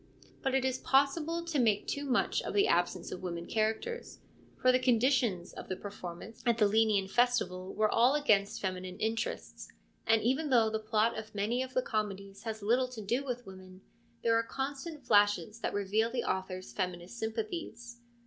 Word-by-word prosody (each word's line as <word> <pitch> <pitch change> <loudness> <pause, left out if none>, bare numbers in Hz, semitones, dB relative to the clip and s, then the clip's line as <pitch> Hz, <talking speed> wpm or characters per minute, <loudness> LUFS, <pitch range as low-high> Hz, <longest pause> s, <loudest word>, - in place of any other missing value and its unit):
But 270 -1 0
it 265 -1 +2
is 260 0 0
possible 305 +5 +2
to 325 -4 -1
make 220 -4 +2
too 285 0 -3
much 260 -3 +1
of - - -5
the 405 +1 +4
absence - - 0
of - - -6
women 170 -2 -4
characters, 220 - -2 0.4
for 255 - +5
the 255 - +3
conditions 245 -7 +2
of - - -8
per 195 +2 -5
formance 185 +4 -9
at 235 -2 +2
the 215 - +4
Lenaean 210 -2 +3
festival 190 -5 +1
were 215 - +3
all 245 +6 +4
against 210 -9 +2
feminine 185 -1 -4
interests, 225 +1 -3 0.4
and 225 -1 +4
even 270 +6 +1
though 230 -4 +4
the 220 - -1
plot 220 +1 +1
of 220 -1 -8
many 220 +5 0
of 260 0 -5
the 255 - +2
comedies 200 -2 -3
has 220 -2 -4
little 245 +5 +3
to 250 -3 -8
do 240 +7 0
with 245 -3 -4
women, 185 0 -12 0.4
there 230 -1 +3
are 230 - +4
constant 275 +4 -5
flashes 205 -2 +3
that - - -2
reveal 205 +3 +1
the 240 0 -2
author's 185 -7 -3
feminist 180 - -4
sympathies. 235 - -5
225 Hz, 180 wpm, -31 LUFS, 200-255 Hz, 0.4 s, for